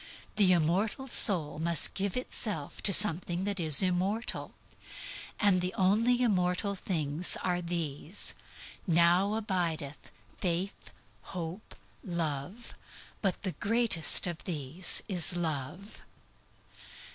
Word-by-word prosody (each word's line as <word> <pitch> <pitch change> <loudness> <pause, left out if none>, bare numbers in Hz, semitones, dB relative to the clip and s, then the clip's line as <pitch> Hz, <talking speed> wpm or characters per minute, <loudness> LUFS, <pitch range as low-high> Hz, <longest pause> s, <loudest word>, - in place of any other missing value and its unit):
The 195 -3 +3
immortal 185 - -1
soul 170 - +4
must 165 -1 +2
give 200 +3 -3
itself 210 - -4
to 200 - +4
something 180 -2 +5
that 200 -1 -2
is 155 -1 +6
immortal. 190 +5 -3 0.8
And 200 -4 +2
the 180 +1 -4
only 230 +6 +1
immortal 190 -2 -1
things 165 -3 0
are 180 -1 -2
these: 170 0 -3 0.5
"Now 175 +4 +2
abideth 170 -9 -4 0.3
faith, 180 +2 -4 0.5
hope, 170 +4 -8 0.3
love, 170 - -5 0.5
but 195 -4 -3
the 190 - -3
greatest 210 0 +2
of 175 -2 -6
these 160 +1 0
is 180 -3 +3
love." 170 - -5
180 Hz, 105 wpm, -28 LUFS, 165-200 Hz, 0.8 s, is